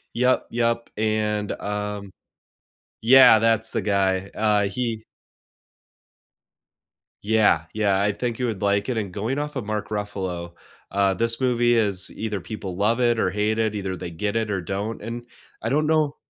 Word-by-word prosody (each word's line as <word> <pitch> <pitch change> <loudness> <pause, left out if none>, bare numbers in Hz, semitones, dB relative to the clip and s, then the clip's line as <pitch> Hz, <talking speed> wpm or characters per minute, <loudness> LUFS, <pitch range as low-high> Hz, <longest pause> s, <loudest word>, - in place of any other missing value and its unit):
Yep. 125 +2 +2
Yep. 115 0 0
And, 105 -1 0
um 105 -1 -4 0.9
yeah, 125 -1 +8
that's 115 0 +2
the 115 - -1
guy. 95 -1 +1
Uh, 105 -1 +2
he 110 +2 -2 2.2
Yeah. 105 -7 +3
Yeah, 100 -3 +2
I 100 +1 +2
think 120 +3 -3
you 125 - 0
would 110 -5 -4
like 100 +2 +1
it. 125 - -1
And 100 -4 -3
going 110 +9 -2
off 150 0 -4
of 130 -5 -3
Mark 105 0 -3
Ruffalo, 95 -5 -4 0.4
uh, 100 -1 +2
this 115 +4 -1
movie 120 -2 +3
is 100 -5 +1
either 105 -2 -4
people 95 0 -6
love 110 +5 +1
it 120 -2 +2
or 95 - +2
hate 105 +2 0
it, 110 -1 0
either 95 -2 -3
they 90 -1 -7
get 100 +6 -3
it 110 -2 0
or 95 -3 -1
don't, 100 +5 -4
and 115 +2 -6 0.4
I 115 - -2
don't 150 +4 +1
know 155 -2 +2
105 Hz, 165 wpm, -24 LUFS, 100-115 Hz, 2.2 s, yeah